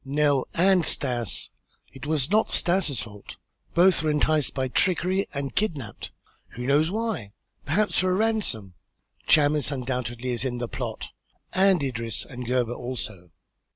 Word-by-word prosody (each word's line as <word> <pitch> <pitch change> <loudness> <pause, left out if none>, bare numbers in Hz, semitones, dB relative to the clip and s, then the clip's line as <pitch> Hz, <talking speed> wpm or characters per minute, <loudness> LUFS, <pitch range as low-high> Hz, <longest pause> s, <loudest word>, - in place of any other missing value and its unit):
"Nell 145 -1 +1
and 185 0 +4
Stas! 120 - +2 0.4
It 135 +2 -9
was 155 0 0
not 215 +1 +3
Stas' 170 - +1
fault. 105 -2 -11 0.4
Both 180 +1 +5
were 155 - 0
enticed 150 -1 +1
by 130 -1 0
trickery 185 +6 +1
and 140 -1 -4
kidnapped. 150 - -2 0.4
Who 125 +1 -6
knows 145 +4 +3
why? 210 - -3 0.3
Perhaps 205 +8 +1
for 185 - +2
a 185 - +2
ransom. 200 - -1 0.5
Chamis 150 -2 +4
undoubtedly 125 -2 -3
is 120 0 -1
in 125 -2 -2
the 120 0 -3
plot, - - -5 0.4
and 190 -4 +4
Idris 115 -5 -3
and 125 -2 -8
Gebhr 120 -1 0
also." 110 -8 -5
140 Hz, 145 wpm, -25 LUFS, 125-175 Hz, 0.5 s, Both